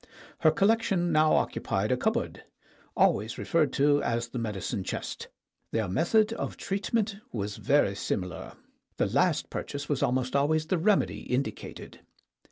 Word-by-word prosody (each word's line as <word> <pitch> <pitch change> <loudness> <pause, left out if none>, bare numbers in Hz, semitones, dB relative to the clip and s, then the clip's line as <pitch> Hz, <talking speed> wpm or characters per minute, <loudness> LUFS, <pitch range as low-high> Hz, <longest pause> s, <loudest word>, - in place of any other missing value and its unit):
Her 155 - +5
collection 195 -1 +2
now 155 0 +4
occupied - - 0
a - - +4
cupboard, - - -1 0.5
always 110 +3 +2
referred 155 -5 +1
to 145 +1 +3
as 115 0 -1
the 125 - -4
medicine 100 -4 -3
chest. - - -5 0.4
Their 110 -3 -1
method 210 - +2
of - - -4
treatment 200 +1 -1
was 105 -3 -4
very 145 -8 +2
similar. 90 -3 -4 0.4
The - - +2
last - - +1
purchase 145 +1 -5
was 145 - -1
almost 125 +1 0
al 140 +1 +3
ways 155 0 +1
the 175 +2 0
remedy 200 +4 +2
indicated. 130 +2 -4
145 Hz, 145 wpm, -28 LUFS, 115-175 Hz, 0.5 s, Her